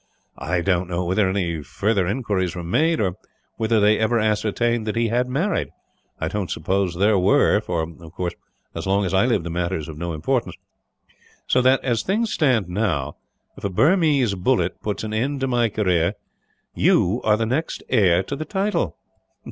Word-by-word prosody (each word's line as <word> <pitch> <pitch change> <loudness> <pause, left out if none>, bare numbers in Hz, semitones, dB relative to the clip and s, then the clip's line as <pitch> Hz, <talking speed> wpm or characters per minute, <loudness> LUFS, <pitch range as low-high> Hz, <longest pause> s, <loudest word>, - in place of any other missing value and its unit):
I 90 -1 -1
don't 90 0 0
know 90 0 -2
whether 95 +2 +2
any 85 -5 -1
further 100 +6 0
inquiries 100 -6 -1
were 90 - -5
made, 155 - +1
or 95 -3 -1 0.4
whether 110 0 +2
they 105 +1 +4
ever 110 +2 +2
ascertained 110 +2 0
that 105 - -2
he 115 0 +1
had 125 +2 +1
married. 170 +10 -1 0.5
I 80 - -1
don't 100 +1 -3
suppose 95 -2 -1
there 100 +2 +3
were 100 +2 +3
for, 90 -6 -2
of 80 0 -10
course, 85 0 -3 0.4
as - - -5
long 100 +1 +2
as 90 - -3
I 95 +5 +3
live 115 -8 +1
the 85 - -5
matter 90 +2 -1
is 75 - -6
of 75 -1 -8
no 85 0 -3
importance. 120 - -1 0.9
"So 125 - +2
that, 130 +1 +3
as 120 -4 0
things 220 +4 -1
stand 125 - +2
now, 90 -7 -2 0.4
if - - -14
a 100 - 0
Burmese 145 - +3
bullet 90 -1 0
puts 105 0 -3
an 110 0 -4
end 135 +6 -1
to 135 - +1
my 120 -2 +2
career, 90 -5 +1 0.6
you 105 +8 +2
are 105 -1 +3
the 115 - 0
next 135 +8 -2
heir 95 -7 +3
to 140 - -5
the 155 - -4
title." 195 +5 -1
105 Hz, 190 wpm, -22 LUFS, 90-120 Hz, 0.9 s, they